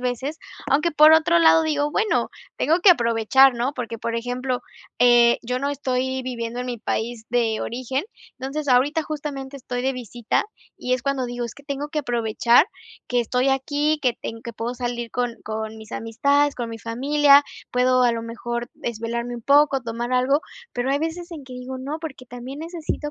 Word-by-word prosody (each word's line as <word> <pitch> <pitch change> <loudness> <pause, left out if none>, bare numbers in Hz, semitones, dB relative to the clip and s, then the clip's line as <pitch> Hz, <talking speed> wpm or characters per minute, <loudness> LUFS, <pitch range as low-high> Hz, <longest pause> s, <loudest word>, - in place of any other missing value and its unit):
veces, 255 +5 -3 0.3
aunque, 300 +4 +2
por 305 +1 +7
otro 335 +2 +5
lado, 325 0 +6
digo: 295 -1 0
"Bueno, 430 +6 +1 0.3
tengo 325 +3 +2
que 365 +1 +8
aprovechar", 240 0 +5
¿no?, 245 +4 -1
porque, 230 -3 -5
por 230 +1 -3
ejemplo, 250 +2 -2 0.4
eh, 240 -1 +6
yo 250 +2 -2
no 280 +2 -1
estoy 260 -1 -2
viviendo 240 -1 -4
en 250 - -4
mi 245 -2 -4
país 225 +1 -3
de 230 -2 +1
origen. 255 +5 -3 0.3
Entonces, 275 +3 -4
ahorita 280 +6 +3
justamente 285 -3 -5
estoy 245 -1 -4
de 265 +1 +1
visita 240 -2 -2 0.3
y 250 - -2
es 255 - -4
cuando 275 -2 -1
digo: 245 0 -4
"Es 235 - -6
que 285 - -16
tengo 280 +1 -4
que 300 - -3
aprovechar 240 +2 +3 0.4
que 245 - +1
estoy 250 +3 0
aquí, 290 +3 +1
que 245 -3 +1
ten 225 0 -5
que 235 - -7
puedo 230 +2 -4
salir 240 -2 -3
con 245 -1 -2
con 220 0 -4
mis 220 +1 -12
amistades, 280 +6 +1
con 235 -2 -4
mi 225 - -7
familia". 280 +6 +4 0.3
Puedo 255 0 +3
a 240 - +4
lo 230 - -3
mejor 235 +1 -5
desvelarme 235 +1 -4
un 235 - -9
poco, 280 0 +4
tomar 235 +2 -4
algo, 265 +4 +2 0.3
pero 245 +2 -1
hay 285 - 0
veces 340 +2 -4
en 310 - -7
que 255 -1 -10
digo: 255 +1 -6
"No, 280 +5 -4
porque 290 -6 -7
también 250 +4 -8
necesito 320 -3 -4
255 Hz, 190 wpm, -23 LUFS, 235-285 Hz, 0.4 s, que